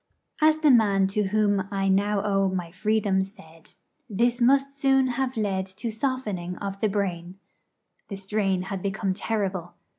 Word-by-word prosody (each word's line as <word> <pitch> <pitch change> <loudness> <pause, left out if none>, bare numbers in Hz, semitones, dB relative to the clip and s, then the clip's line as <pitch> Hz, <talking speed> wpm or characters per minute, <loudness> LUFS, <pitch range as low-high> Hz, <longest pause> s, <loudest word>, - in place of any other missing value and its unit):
As 310 0 +5
the 310 -2 +4
man 205 -5 +4
to 210 +1 0
whom 205 0 +2
I 195 -1 -2
was 195 - +2
now 200 +1 +1
to 210 - -3
owe 195 -1 +2
my 180 -3 -4
freedom 200 0 +1
said, 165 -5 -15 0.3
this 235 +4 +1
must 275 +3 +3
soon 270 -1 +3
have 255 0 -2
led 195 -3 -1
to 210 +4 -5
softening 215 -7 -3
of 195 -1 -5
the 215 - +2
brain. 185 -3 -3 0.7
The 200 - -6
strain 195 -1 -1
had 195 0 -5
become 195 0 -1
terrible. 190 -4 -3
200 Hz, 170 wpm, -25 LUFS, 190-225 Hz, 0.7 s, As